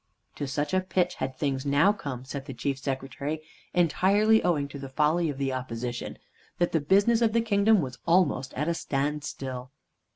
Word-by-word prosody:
To 145 Hz, -, -3 dB
such 145 Hz, +3 st, -2 dB
a 185 Hz, -, +3 dB
pitch 185 Hz, -1 st, 0 dB
had 130 Hz, 0 st, -2 dB
things 135 Hz, -1 st, -1 dB
now 145 Hz, +8 st, +4 dB
come, 130 Hz, -10 st, -6 dB
said 135 Hz, +1 st, -6 dB
the 135 Hz, -4 st, -7 dB
Chief 135 Hz, +2 st, -2 dB
Secretary, 135 Hz, +3 st, -3 dB, 0.3 s
entirely 195 Hz, +6 st, +4 dB
owing 150 Hz, -5 st, +1 dB
to 140 Hz, -, -8 dB
the 135 Hz, -1 st, -7 dB
folly 155 Hz, +4 st, +2 dB
of 140 Hz, -, -4 dB
the 135 Hz, -1 st, -1 dB
Opposition, 120 Hz, -1 st, -4 dB, 0.4 s
that 175 Hz, -, +1 dB
the 160 Hz, -, +1 dB
business 200 Hz, +9 st, +3 dB
of 225 Hz, -2 st, +3 dB
the 230 Hz, -, +3 dB
kingdom 210 Hz, -2 st, +3 dB
was 130 Hz, -3 st, -6 dB
almost 165 Hz, -7 st, +2 dB
at 150 Hz, +4 st, -1 dB
a 170 Hz, -, +2 dB
standstill. 135 Hz, -4 st, -3 dB
145 Hz, 185 wpm, -27 LUFS, 135-180 Hz, 0.4 s, now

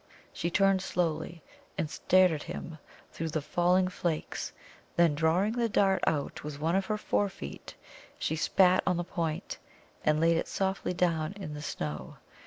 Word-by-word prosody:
She 170 Hz, -, -2 dB
turned 195 Hz, +1 st, +3 dB
slowly, 170 Hz, -3 st, -2 dB, 0.3 s
and 155 Hz, -, 0 dB
stared 185 Hz, +5 st, +4 dB
at 155 Hz, -2 st, -3 dB
him 160 Hz, +1 st, -7 dB, 0.3 s
through 165 Hz, 0 st, -4 dB
the 155 Hz, -, -1 dB
falling 180 Hz, +3 st, +3 dB
flakes; 170 Hz, -3 st, -3 dB, 0.4 s
then, 170 Hz, -3 st, +4 dB
drawing 165 Hz, +7 st, +2 dB
the 235 Hz, 0 st, 0 dB
dart 195 Hz, -2 st, +2 dB
out 145 Hz, -3 st, -1 dB
with 150 Hz, -1 st, -6 dB
one 165 Hz, +4 st, +1 dB
of 195 Hz, 0 st, +1 dB
her 215 Hz, -1 st, 0 dB
forefeet, 200 Hz, -, -3 dB, 0.4 s
she 160 Hz, -, -1 dB
spat 180 Hz, +3 st, +4 dB
on 180 Hz, -1 st, +2 dB
the 175 Hz, -, -1 dB
point, 165 Hz, -3 st, -3 dB, 0.4 s
and 155 Hz, 0 st, +3 dB
laid 165 Hz, +1 st, +4 dB
it -, -, -1 dB
softly 190 Hz, -1 st, -1 dB
down 165 Hz, -2 st, +1 dB
in 195 Hz, -7 st, -7 dB
the 150 Hz, -, -6 dB
snow. 75 Hz, -, -5 dB
170 Hz, 165 wpm, -30 LUFS, 155-190 Hz, 0.4 s, stared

